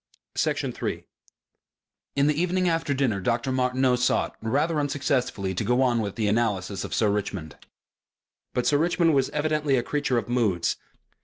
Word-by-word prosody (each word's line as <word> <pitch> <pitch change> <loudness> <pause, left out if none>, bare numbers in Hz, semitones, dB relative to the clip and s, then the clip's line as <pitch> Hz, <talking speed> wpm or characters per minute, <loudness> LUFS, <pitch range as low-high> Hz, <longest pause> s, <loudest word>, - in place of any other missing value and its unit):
Section - - 0
3 - - -4 1.1
In 140 0 +3
the 150 - +3
evening 180 +1 +1
after 165 -2 0
dinner 130 -8 +1
Dr. 120 +5 0
Martineau 130 0 +2
sought, 125 0 +1
rather 150 +8 +1
unsuccessfully, 135 -9 -1
to 95 - -2
go 125 +5 +2
on 120 -3 +2
with 100 -2 -4
the 110 -2 0
analysis 100 -3 0
of - - -4
Sir 105 -3 +2
Richmond. 95 -6 -3 1.0
But 125 - 0
Sir 145 - +3
Richmond 170 0 +2
was 135 -2 +2
evidently 150 -2 0
a 120 - 0
creature 140 -2 0
of 115 - -2
moods. 115 -8 +1
125 Hz, 160 wpm, -25 LUFS, 110-145 Hz, 1.1 s, In